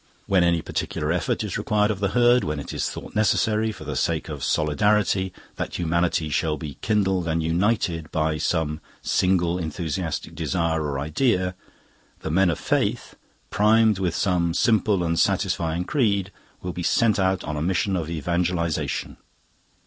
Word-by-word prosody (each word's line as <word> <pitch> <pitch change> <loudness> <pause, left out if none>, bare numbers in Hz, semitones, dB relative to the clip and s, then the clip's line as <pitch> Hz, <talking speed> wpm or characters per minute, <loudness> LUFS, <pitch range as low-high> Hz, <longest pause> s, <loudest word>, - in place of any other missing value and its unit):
When 95 -2 +3
any 85 -2 +2
particular - - -2
effort - - 0
is - - -3
required 105 0 +1
of 100 - -4
the 100 - +1
Herd, 120 +3 +4
when 75 -1 -2
it 70 - -7
is - - -1
thought - - -8
necessary, 110 +1 +2
for 100 - -10
the 75 -1 -5
sake 80 +5 -1
of 75 -3 -6
solidarity, 95 +4 +1 0.3
that - - -4
humanity 85 -1 0
shall 75 +2 0
be 75 -4 -8
kindled 95 -5 +1
and 80 0 0
united 85 -2 0
by 80 -1 0
some 80 -1 -1 0.2
single 90 -1 +1
enthusiastic 80 0 -3
desire 85 -1 -1
or 75 -2 -2
idea, 90 - +1 0.7
the 80 - -3
Men 95 +2 +3
of 85 - -1
Faith, - - -1 0.4
primed 110 -1 +4
with 90 -3 -1
some 85 -4 +1
simple 105 -4 +2
and 85 -1 0
satisfying 85 +1 +1
creed, 100 -6 0 0.3
will 90 -1 -4
be 90 - -5
sent 110 +4 +2
out 95 0 +1
on 75 - -4
a 75 - -3
mission 95 +3 0
of 80 -3 -2
evangelisation. 85 0 -1
90 Hz, 160 wpm, -24 LUFS, 80-100 Hz, 0.7 s, Herd